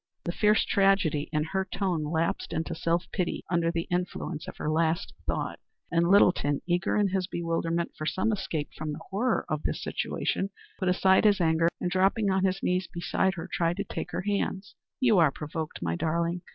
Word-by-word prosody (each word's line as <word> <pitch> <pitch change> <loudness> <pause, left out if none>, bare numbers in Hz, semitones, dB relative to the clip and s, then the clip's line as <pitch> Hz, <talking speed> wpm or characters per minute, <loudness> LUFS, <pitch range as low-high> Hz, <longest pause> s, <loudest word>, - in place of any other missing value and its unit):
The 175 - -2
fierce 210 +4 +3
tragedy 195 -7 +2
in 150 -1 +1
her 190 +4 -1
tone 185 -4 -1
lapsed 160 +2 -1
into 165 +1 -2
self 170 +2 0
pity 180 -2 -2
under 170 -1 +2
the 170 -1 -2
influence 175 -2 -2
of - - -8
her - - -4
last 160 +3 +1
thought, - - -2 0.3
and 170 0 +3
Littleton, 175 -7 +4
eager 175 +3 +1
in 205 -2 +3
his 185 -1 -1
bewilderment 170 -1 -1
for 155 - -4
some 190 +7 +1
escape 170 -7 -2
from 155 -1 -4
the 155 - -8
horror 225 +5 +1
of 155 -3 -2
the - - -1
situation, 195 - -2 0.3
put 185 - +1
aside 190 +2 +4
his 205 -2 +5
anger 165 0 +3
and 180 - -2
dropping 195 +2 +2
on 190 0 +1
his 190 +1 -1
knees 180 0 +1
beside 185 +2 0
her 165 - -6
tried 170 +1 0
to 200 - -1
take - - -5
her - - -3
hands. 200 -1 -2 0.3
"You 230 -7 +4
are 160 -3 +6
provoked, 155 - -5
my 85 -1 0
darling. 170 - -1
175 Hz, 190 wpm, -28 LUFS, 160-190 Hz, 0.3 s, are